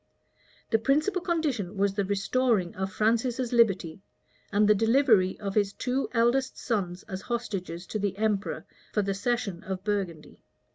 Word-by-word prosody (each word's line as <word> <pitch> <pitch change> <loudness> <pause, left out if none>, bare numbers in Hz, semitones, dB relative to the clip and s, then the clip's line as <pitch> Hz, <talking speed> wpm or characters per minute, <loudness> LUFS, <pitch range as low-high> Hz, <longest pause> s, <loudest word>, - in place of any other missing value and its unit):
The 225 - +4
principal 305 - +1
condition 280 - -1
was 200 0 +2
the 200 0 0
restoring 200 0 +1
of 190 0 -3
Francis's 235 +3 0
liberty, 195 -7 +2 0.5
and 210 0 +3
the 210 - +7
delivery 225 -3 +3
of 200 -2 -4
his 200 -1 +1
two 260 +2 -1
eldest 245 +3 +2
sons 190 -6 -2
as 190 0 -6
hostages 195 -7 -4
to 215 - -4
the 200 -1 -2
emperor 210 -1 -1 0.3
for 210 - +2
the 195 0 -1
cession 200 -3 -2
of 190 0 -5
Burgundy. 195 -7 -3
210 Hz, 150 wpm, -28 LUFS, 195-240 Hz, 0.5 s, the